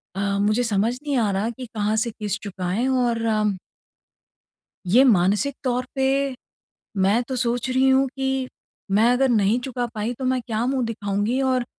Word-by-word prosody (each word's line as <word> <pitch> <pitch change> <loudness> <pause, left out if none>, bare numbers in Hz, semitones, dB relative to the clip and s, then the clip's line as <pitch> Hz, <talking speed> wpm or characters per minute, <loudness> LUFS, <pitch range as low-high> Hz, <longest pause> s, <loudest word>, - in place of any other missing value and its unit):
अ, - - -4 0.2
मुझे 215 +4 +2
समझ 220 +1 +1
नहीं 285 -3 -1
आ 220 -3 +2
रहा 200 +4 -1
कि 250 +2 -7
कहाँ 210 +1 0
से 225 +1 0
किश्त 210 0 -4
चुकाएँ 190 +4 -2
और 245 -3 +1 1.7
ये 235 +9 +5
मानसिक 210 +5 +3
तौर 250 0 0
पे, 270 0 +1 0.6
मैं 200 +5 +3
तो 260 - -3
सोच 245 +1 0
रही 260 +1 +3
हूँ 265 +1 +4
कि 265 -1 -1 0.4
मैं 225 +4 +4
अगर 260 +1 +2
नहीं 215 +1 +2
चुका 245 -1 -3
पाई 220 +3 -2
तो 260 - -3
मैं 255 -1 +1
क्या 230 0 -2
मुँह 260 -2 0
दिखाऊँगी? 215 +3 -1
और 255 -2 +1
240 Hz, 170 wpm, -23 LUFS, 210-260 Hz, 1.7 s, ये